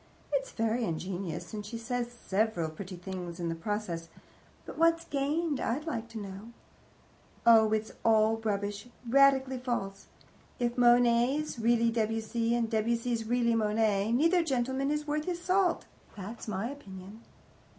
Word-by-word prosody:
It's -, -, 0 dB
very 225 Hz, +1 st, 0 dB
ingenious, 175 Hz, 0 st, -4 dB
and 210 Hz, -1 st, -4 dB
she 210 Hz, +3 st, -6 dB
says 240 Hz, +1 st, -3 dB
several 205 Hz, -7 st, -1 dB
pretty 185 Hz, +3 st, -8 dB
things 180 Hz, -1 st, -6 dB
in 170 Hz, -1 st, -2 dB
the -, -, -1 dB
process, 170 Hz, -2 st, -4 dB, 0.6 s
but -, -, -8 dB
what's 330 Hz, 0 st, +3 dB
gained, 290 Hz, +1 st, -1 dB
I'd 270 Hz, +7 st, -1 dB
like 230 Hz, -8 st, -4 dB
to 230 Hz, -, -8 dB
know? 205 Hz, +2 st, -8 dB, 0.9 s
Oh, 220 Hz, -2 st, +7 dB
it's 220 Hz, 0 st, 0 dB
all 220 Hz, 0 st, +4 dB
rubbish, 205 Hz, -1 st, -3 dB, 0.2 s
radically 265 Hz, 0 st, +4 dB
false. 200 Hz, -6 st, -3 dB, 0.5 s
If 240 Hz, -1 st, -1 dB
Monet's 245 Hz, +3 st, +3 dB
really 235 Hz, 0 st, +3 dB
Debussy, 225 Hz, +1 st, 0 dB
and 235 Hz, -1 st, +1 dB
Debussy's 230 Hz, +1 st, 0 dB
really 235 Hz, 0 st, +2 dB
Monet, 215 Hz, -1 st, +1 dB
neither 330 Hz, +7 st, +4 dB
gentleman 265 Hz, -1 st, 0 dB
is 300 Hz, 0 st, -1 dB
worth 300 Hz, 0 st, -1 dB
his 355 Hz, -1 st, -2 dB
salt 365 Hz, 0 st, +1 dB, 0.3 s
that's 215 Hz, +5 st, -7 dB
my 215 Hz, +4 st, -2 dB
opinion. 200 Hz, -5 st, -10 dB
230 Hz, 140 wpm, -30 LUFS, 205-260 Hz, 0.9 s, Oh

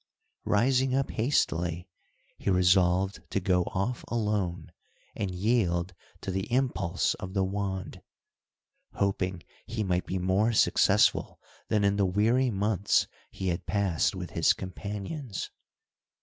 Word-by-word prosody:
Rising 130 Hz, +4 st, +2 dB
up 135 Hz, 0 st, 0 dB
hastily, 90 Hz, -, 0 dB, 0.5 s
he -, -, -2 dB
resolved 90 Hz, +1 st, +3 dB
to -, -, 0 dB
go 90 Hz, -1 st, +1 dB
off 110 Hz, +6 st, -2 dB
alone, 105 Hz, -7 st, -2 dB, 0.4 s
and 100 Hz, -, -2 dB
yield 90 Hz, -3 st, 0 dB, 0.3 s
to 95 Hz, -, -3 dB
the 95 Hz, +3 st, -3 dB
impulse 120 Hz, -9 st, +1 dB
of 95 Hz, +1 st, -7 dB
the 95 Hz, -, +2 dB
wand. 95 Hz, -3 st, -3 dB, 0.9 s
Hoping 95 Hz, -3 st, -1 dB, 0.2 s
he 110 Hz, -1 st, -2 dB
might 90 Hz, -2 st, -1 dB
be 95 Hz, -, -2 dB
more 95 Hz, +5 st, +2 dB
successful -, -, +3 dB, 0.3 s
than 105 Hz, -2 st, +1 dB
in 100 Hz, 0 st, +2 dB
the 100 Hz, -, +3 dB
weary 115 Hz, +7 st, +2 dB
months 100 Hz, -1 st, +1 dB, 0.2 s
he 95 Hz, -, -3 dB
had 85 Hz, -, -3 dB
passed 100 Hz, -3 st, +1 dB
with 90 Hz, -3 st, -6 dB
his 85 Hz, -, +3 dB
companions. 100 Hz, -, -6 dB
95 Hz, 125 wpm, -28 LUFS, 90-105 Hz, 0.9 s, resolved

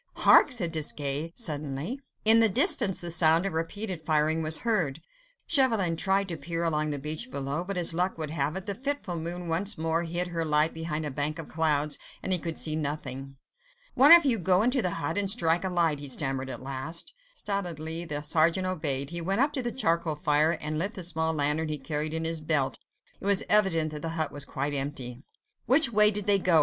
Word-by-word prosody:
"Hark!" -, -, +5 dB
said 185 Hz, -10 st, +2 dB
Desgas 150 Hz, -1 st, -2 dB
suddenly. 150 Hz, -, -4 dB, 0.3 s
In 225 Hz, +1 st, +7 dB
the 225 Hz, -1 st, +5 dB
distance 230 Hz, -, +3 dB
the 175 Hz, -1 st, -3 dB
sound 165 Hz, +1 st, +4 dB
of 195 Hz, -, -3 dB
repeated 180 Hz, +2 st, -4 dB
firing 155 Hz, +1 st, +1 dB
was 155 Hz, 0 st, +4 dB
heard. 180 Hz, -, 0 dB, 0.5 s
Chauvelin 225 Hz, -, +2 dB
tried 195 Hz, +3 st, +1 dB
to 165 Hz, -, -4 dB
peer 165 Hz, +3 st, -4 dB
along 155 Hz, -2 st, 0 dB
the 145 Hz, -, -2 dB
beach 155 Hz, -, -4 dB
below, 140 Hz, -, -4 dB
but 195 Hz, +1 st, -5 dB
as 170 Hz, -2 st, +2 dB
luck 180 Hz, +2 st, -1 dB
would 155 Hz, -2 st, -5 dB
have 150 Hz, 0 st, -2 dB
it, 190 Hz, 0 st, -6 dB
the 200 Hz, -, -3 dB
fitful 265 Hz, -5 st, -4 dB
moon 170 Hz, +2 st, -4 dB
once 190 Hz, +6 st, 0 dB
more 160 Hz, +1 st, 0 dB
hid 175 Hz, +1 st, -2 dB
her 165 Hz, -1 st, -2 dB
light 150 Hz, 0 st, +1 dB
behind 160 Hz, -1 st, -4 dB
a 145 Hz, -, -4 dB
bank 145 Hz, +4 st, -2 dB
of 165 Hz, -, -8 dB
clouds, 150 Hz, -2 st, 0 dB, 0.2 s
and 190 Hz, -, +1 dB
he 180 Hz, -, +3 dB
could 165 Hz, -1 st, -5 dB
see 155 Hz, -1 st, +1 dB
nothing. 135 Hz, -3 st, -5 dB, 0.6 s
"One 275 Hz, +5 st, +6 dB
of 340 Hz, -2 st, +9 dB
you 240 Hz, -5 st, +2 dB
go 185 Hz, +3 st, +2 dB
into 250 Hz, +2 st, +1 dB
the 185 Hz, -, -1 dB
hut 165 Hz, +5 st, -1 dB
and 200 Hz, -1 st, +2 dB
strike 175 Hz, -5 st, +3 dB
a 190 Hz, -, -2 dB
light," 165 Hz, -5 st, 0 dB
he 145 Hz, -, -7 dB
stammered 135 Hz, 0 st, -1 dB
at 130 Hz, -, -7 dB
last. 140 Hz, -, -4 dB, 0.2 s
Stolidly 170 Hz, -, -4 dB
the 150 Hz, -3 st, -4 dB
sergeant 165 Hz, +4 st, +2 dB
obeyed: 145 Hz, -6 st, -2 dB
he 170 Hz, 0 st, -4 dB
went 195 Hz, +7 st, 0 dB
up 290 Hz, +2 st, +1 dB
to 265 Hz, -, -2 dB
the 240 Hz, -1 st, -3 dB
charcoal 170 Hz, -, -1 dB
fire 150 Hz, 0 st, +1 dB
and 155 Hz, 0 st, -4 dB
lit 200 Hz, +6 st, -2 dB
the 185 Hz, -, -5 dB
small 160 Hz, -1 st, 0 dB
lantern 150 Hz, +1 st, 0 dB
he 150 Hz, -, -2 dB
carried 150 Hz, +2 st, -3 dB
in 160 Hz, 0 st, -2 dB
his 165 Hz, -1 st, -1 dB
belt; 155 Hz, -4 st, -1 dB, 0.4 s
it -, -, -10 dB
was 200 Hz, -1 st, +3 dB
evident 170 Hz, -7 st, +3 dB
that 150 Hz, -1 st, -7 dB
the 165 Hz, -, -4 dB
hut 155 Hz, -3 st, -1 dB
was 145 Hz, 0 st, -4 dB
quite 140 Hz, +1 st, -4 dB
empty. 135 Hz, -3 st, -5 dB, 0.5 s
"Which 265 Hz, -1 st, +4 dB
way 210 Hz, 0 st, +6 dB
did 210 Hz, -1 st, -3 dB
they 200 Hz, -1 st, +3 dB
go?" 175 Hz, -3 st, +3 dB
165 Hz, 215 wpm, -27 LUFS, 150-190 Hz, 0.6 s, of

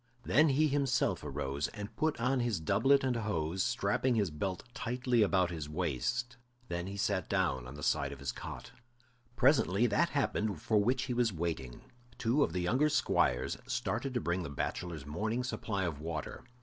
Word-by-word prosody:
Then 150 Hz, +4 st, +4 dB
he 150 Hz, +3 st, +3 dB
himself 135 Hz, -, +1 dB
arose 70 Hz, 0 st, -2 dB
and 105 Hz, 0 st, -8 dB
put 155 Hz, -5 st, 0 dB
on 130 Hz, +3 st, +1 dB
his 120 Hz, -7 st, 0 dB
doublet 135 Hz, -, +3 dB
and 130 Hz, -2 st, +1 dB
hose, 95 Hz, -5 st, -1 dB
strapping 120 Hz, +2 st, +1 dB
his 100 Hz, -7 st, +1 dB
belt 90 Hz, +5 st, -3 dB
tightly 125 Hz, 0 st, 0 dB
about 95 Hz, -4 st, +3 dB
his 80 Hz, -4 st, -5 dB
waist; 90 Hz, -, -2 dB, 0.3 s
then 85 Hz, +1 st, -3 dB
he 100 Hz, +1 st, -6 dB
sat 100 Hz, -3 st, 0 dB
down 65 Hz, -2 st, 0 dB
on 65 Hz, -, -9 dB
the 75 Hz, -, -8 dB
side 70 Hz, -, +1 dB
of 70 Hz, -, -7 dB
his 70 Hz, -2 st, -3 dB
cot. -, -, -8 dB, 0.6 s
Presently 120 Hz, -5 st, +4 dB
that 155 Hz, +10 st, +2 dB
happened 110 Hz, -, 0 dB
for 105 Hz, +4 st, +2 dB
which 125 Hz, +3 st, +1 dB
he 130 Hz, -2 st, -2 dB
was 120 Hz, -2 st, +2 dB
waiting; 80 Hz, -8 st, -4 dB, 0.4 s
two 125 Hz, +5 st, +2 dB
of 140 Hz, -, +3 dB
the 90 Hz, +1 st, -1 dB
younger 125 Hz, +12 st, +2 dB
squires 65 Hz, -, +1 dB
started 120 Hz, +1 st, -2 dB
to -, -, +2 dB
bring 85 Hz, +2 st, 0 dB
the 85 Hz, -, -5 dB
bachelors' 75 Hz, +2 st, -4 dB
morning 110 Hz, +11 st, -2 dB
supply 110 Hz, -5 st, -2 dB
of 80 Hz, -5 st, -2 dB
water. 80 Hz, -, -5 dB
100 Hz, 180 wpm, -32 LUFS, 80-125 Hz, 0.6 s, Then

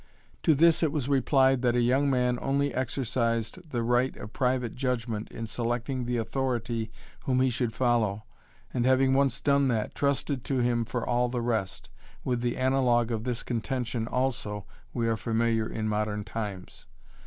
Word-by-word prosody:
To 160 Hz, -, +4 dB
this 165 Hz, +3 st, +5 dB
it 160 Hz, -3 st, +2 dB
was 145 Hz, -4 st, -2 dB
replied 135 Hz, -1 st, +3 dB
that 120 Hz, -1 st, +2 dB
a -, -, +3 dB
young 130 Hz, +4 st, +3 dB
man 125 Hz, -2 st, +1 dB
only 140 Hz, +1 st, 0 dB
exercised 115 Hz, -1 st, -1 dB
the 120 Hz, -4 st, -1 dB
right 120 Hz, +2 st, +1 dB
of 105 Hz, -, -9 dB
private 125 Hz, -3 st, 0 dB
judgment 120 Hz, -4 st, -2 dB
in 115 Hz, -, -6 dB
selecting 120 Hz, +2 st, -2 dB
the 120 Hz, 0 st, -1 dB
authority 115 Hz, -2 st, -2 dB, 0.4 s
whom 130 Hz, -1 st, +2 dB
he 130 Hz, 0 st, +3 dB
should 120 Hz, -1 st, -1 dB
follow, 115 Hz, -4 st, +1 dB, 0.5 s
and, 125 Hz, -, +1 dB
having 130 Hz, +1 st, +4 dB
once 135 Hz, -1 st, +2 dB
done 140 Hz, -1 st, +3 dB
that, 115 Hz, -4 st, -1 dB
trusted 140 Hz, -2 st, -1 dB
to 135 Hz, -, -1 dB
him 120 Hz, -1 st, +1 dB
for 115 Hz, +1 st, -3 dB
all 125 Hz, 0 st, +2 dB
the 120 Hz, -1 st, -2 dB
rest. 100 Hz, -, -2 dB, 0.3 s
With 125 Hz, -2 st, -1 dB
the 120 Hz, -1 st, -1 dB
analogue 125 Hz, -3 st, +2 dB
of 110 Hz, 0 st, -2 dB
this 120 Hz, -2 st, -2 dB
contention 120 Hz, -1 st, -2 dB
also 120 Hz, -6 st, -2 dB, 0.3 s
we 115 Hz, -2 st, -1 dB
are 115 Hz, -1 st, +1 dB
familiar 115 Hz, -1 st, 0 dB
in 110 Hz, -1 st, -3 dB
modern 105 Hz, 0 st, -1 dB
times. 100 Hz, -, -6 dB
120 Hz, 170 wpm, -28 LUFS, 115-130 Hz, 0.5 s, this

